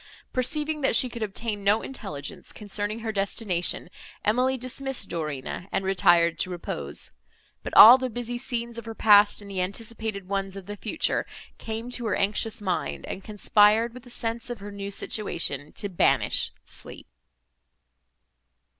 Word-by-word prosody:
Perceiving 300 +4 +1
that 265 - +2
she 255 - +5
could 235 -1 -8
obtain 210 0 -3
no 205 +3 +3
intelligence 145 - -6
concerning 210 +1 -3
her 225 -1 -2
destination, 195 -4 0 0.4
Emily 255 +5 +2
dismissed 260 +1 -3
Dorina, 155 +1 -4
and 195 0 -1
retired 175 -3 +3
to - - 0
repose; 75 - -5 0.5
but - - -6
all 240 +5 +11
the 260 -1 -2
busy 240 +1 -4
scenes 235 -2 -4
of 230 - -11
her 225 0 -7
past 205 -1 +5
and 200 - -10
the 190 -2 -1
anticipated 215 0 -4
ones 195 0 -2
of 195 -2 -8
the 205 +2 -6
future 220 +9 -1 0.3
came 225 +2 -5
to 245 -2 -2
her - - +1
anxious 210 +2 0
mind, 185 -3 -2
and 190 - -6
conspired 215 +2 +3
with 250 - -10
the 245 - -16
sense 235 +1 -3
of 240 - -4
her 205 +1 -8
new 200 0 -6
situation 165 -8 -1
to 205 - -2
banish 185 -4 +2
sleep. - - -7
210 Hz, 155 wpm, -26 LUFS, 195-235 Hz, 0.5 s, all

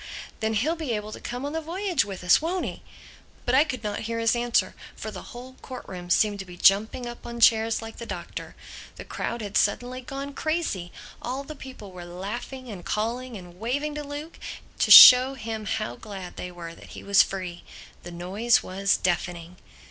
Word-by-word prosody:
"Then 220 0 -1
he'll 300 +10 +1
be 315 -8 -3
able 210 0 -4
to - - -8
come 245 +3 -5
on 290 - -4
the 320 - -2
voyage 355 0 0
with 195 -2 -8
us, 180 - +5
won't 350 +3 -1
he?" - - -6 0.6
But 245 - 0
I 270 +3 +7
could 255 -7 -5
not 210 -1 -2
hear 230 - -2
his 230 +1 +2
answer; 240 0 +1 0.2
for - - -6
the - - -8
whole 250 +1 -10
court 255 -1 -8
room 180 -2 -8
seemed 205 +3 +2
to 195 - -5
be 180 -1 -12
jumping 215 +7 +3
up 240 0 -8
on 235 0 -7
chairs 225 0 +4
like 225 0 -9
the 235 - -8
Doctor. - - -7 0.4
The - - -9
crowd 235 - -4
had 205 -1 -2
suddenly 245 +5 0
gone 275 +2 -6
crazy. 310 - -2 0.3
All 260 +3 -4
the 305 +2 -9
people 255 -8 -10
were 180 -1 -9
laughing 205 +9 -6
and 195 -6 -8
calling 235 +4 -3
and 180 -1 -13
waving 285 +7 -2
to 300 0 -5
Luke 290 +3 -8 0.4
to - - +2
show 255 +2 +11
him 220 -3 -5
how 120 -8 -2
glad 195 -4 -8
they 180 - -6
were 170 -1 -8
that - - -14
he - - -9
was 200 0 +6
free. 185 -3 -4 0.4
The 175 - -9
noise 195 +8 +1
was 195 +1 +1
deafening. 175 -1 -2
225 Hz, 200 wpm, -26 LUFS, 195-260 Hz, 0.6 s, show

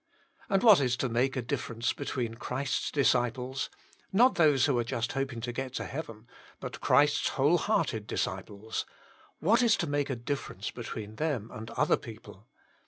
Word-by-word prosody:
And 195 -2 +2
what 215 -7 +8
is 125 -2 +1
to 130 - -1
make 125 +4 +1
a 125 - -1
difference 115 +1 -2
between 125 -5 -3
Christ's 130 +3 -2
disciples 130 -1 +1 0.2
— - - -29
not 245 +7 +5
those 150 -6 +4
who 135 -5 +2
are - - +1
just 115 0 -2
hoping 135 -4 -3
to 120 +1 -3
get 130 +1 -5
to - - -2
heaven, 115 -7 -7 0.3
but - - -7
Christ's 145 +1 +4
whole 145 +6 +4
hearted 150 - 0
disciples 100 +3 -3 0.3
— - - -29
what 220 +9 +4
is 225 -2 +4
to - - -1
make 145 -2 -1
a 130 - -1
difference 120 -5 -4
between 110 -3 -7
them 140 -9 -2
and 110 0 -7
other 150 +6 +2
people? 110 -2 -12
130 Hz, 175 wpm, -30 LUFS, 115-145 Hz, 0.3 s, what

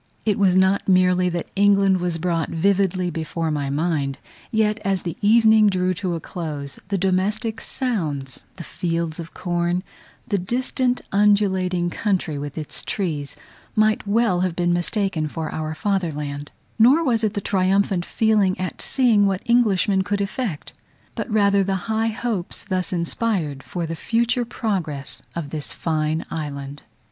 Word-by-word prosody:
It 210 -2 +1
was 190 -2 +4
not 190 +1 +3
merely 180 -1 +4
that 175 -1 -4
England 195 -1 +4
was 175 -2 -1
brought 165 -1 -1
vividly 185 0 +1
before 165 0 -3
my 145 -2 -1
mind; 145 -2 -1 0.3
yet, 220 -1 +1
as 195 -2 0
the 170 -3 -4
evening 220 0 +6
drew 185 -2 +1
to 180 -1 -2
a - - -3
close, 150 -5 -6
the 200 0 0
domestic 200 +4 0
sounds, 155 - -2
the 170 - -8
fields 170 -2 -3
of 165 -1 -8
corn, 175 0 -1 0.4
the 200 -3 0
distant 250 +5 0
undulating 190 -4 +2
country 180 -9 -1
with 145 +1 -6
its 155 -2 -5
trees 155 -8 -3 0.4
might 215 -1 +2
well 205 -3 +2
have 180 -2 0
been 175 0 +1
mistaken 175 -2 0
for 160 +1 -5
our 155 0 -3
fatherland: 150 -8 -2 0.3
nor 265 +9 +6
was 235 -6 +1
it 210 -1 0
the - - 0
triumphant 190 -1 +1
feeling 210 -3 +2
at 185 - -4
seeing 230 -6 +3
what 195 -1 -1
Englishmen 210 -5 +3
could 200 +2 -1
effect; 200 - -3 0.4
but - - -4
rather 200 -2 +3
the 195 0 0
high 220 0 0
hopes 220 -6 -2
thus 185 -3 -1
inspired 170 - -1
for 175 +4 -4
the 165 +1 -4
future 235 +6 0
progress 185 - -3
of 155 -4 -4
this 150 -2 -3
fine 155 -1 -1
island. 145 -2 -5
185 Hz, 155 wpm, -22 LUFS, 165-210 Hz, 0.4 s, evening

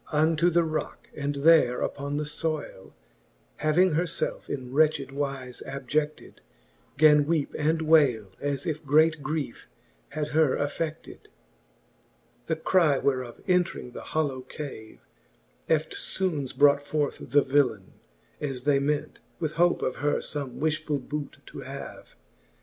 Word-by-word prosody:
Unto 160 +2 +3
the 170 0 +3
rocke, 155 -1 -4
and 145 0 -2
there 140 -4 +4
upon 140 +1 -3
the 150 - -1
fbyle 150 - -4 0.6
Having 175 +4 +3
her 165 +4 +1
felfe 165 - -3
in 130 -2 -5
wretched 150 -2 +2
wize 135 -2 -4
abjecied, 150 +3 -3 0.6
Gan 150 -1 +6
weepe 160 -3 0
and 160 +2 +1
wayle, 135 - +4
as 140 -1 -2
if 155 -2 -3
great 155 +2 +3
griefe 145 - -4 0.4
had 150 0 -3
her 155 -3 +3
afFeded. 155 +2 -3 0.2
X. - - -22 1.2
The 160 - +1
cry 160 -3 +3
whereof 130 -3 -2
entring 180 -8 0
the - - -8
hollow 145 -5 -2
cave, 130 -5 -9 0.7
Eftfoones 155 -1 -1
brought 145 0 +5
forth 145 0 -1
the 145 +3 +2
villaine, 140 -1 +1 0.5
as 135 -4 -4
they 140 0 +3
ment, 145 +1 -2 0.2
With 160 -3 -1
hope 175 +3 +2
of 130 - -1
her 145 +1 +1
fome 140 -4 -4
wifhfull 155 -2 -1
boote 150 -1 -6
to - - -10
have. - - -9
150 Hz, 135 wpm, -27 LUFS, 140-155 Hz, 1.2 s, Gan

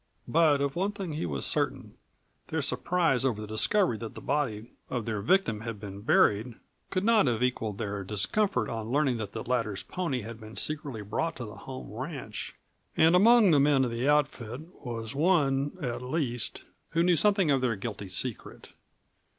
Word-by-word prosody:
But 155 -3 +4
of 140 -1 -1
one 195 +4 0
thing 195 -6 -5
he 150 - -2
was 70 -4 -2
certain - - 0 0.5
their - - -2
surprise 165 -8 +1
over 125 -6 0
the 105 - -5
discovery 110 - +1
that 115 -1 -7
the - - -6
body 125 -6 -2 0.2
of 120 -4 -3
their 110 -3 -2
victim 115 - +2
had 115 -2 -5
been 100 -1 -8
buried 110 +2 +3 0.3
could 185 0 -1
not 220 -7 +4
have 120 -1 +1
equalled 110 -5 -1
their 100 -1 -3
discomfiture 110 - 0
on 110 -1 -4
learning 135 -2 +2
that 105 -3 -5
the 110 - -4
latter's 115 -5 -1
pony 165 -9 -2
had 115 +1 -8
been 110 0 -11
secretly 145 -8 -2
brought 160 +11 -2
to 120 - -6
the 105 - -9
home 130 +4 -9
ranch, 130 -3 -6 0.4
and 160 +2 +5
that - - +7
among 225 0 +6
the 145 - +5
men 140 -2 +4
of 120 - -3
the 120 +4 0
outfit 135 -4 0 0.2
was 115 -3 -5
one, 145 -3 +2
at 120 -2 -3
least, 125 -3 -2 0.3
who 165 +1 +3
knew 180 0 +4
something 195 -2 +3
of 135 -2 +2
their 120 -3 +1
guilty 100 0 -6
secret. 100 +6 -2
125 Hz, 185 wpm, -28 LUFS, 110-155 Hz, 0.5 s, that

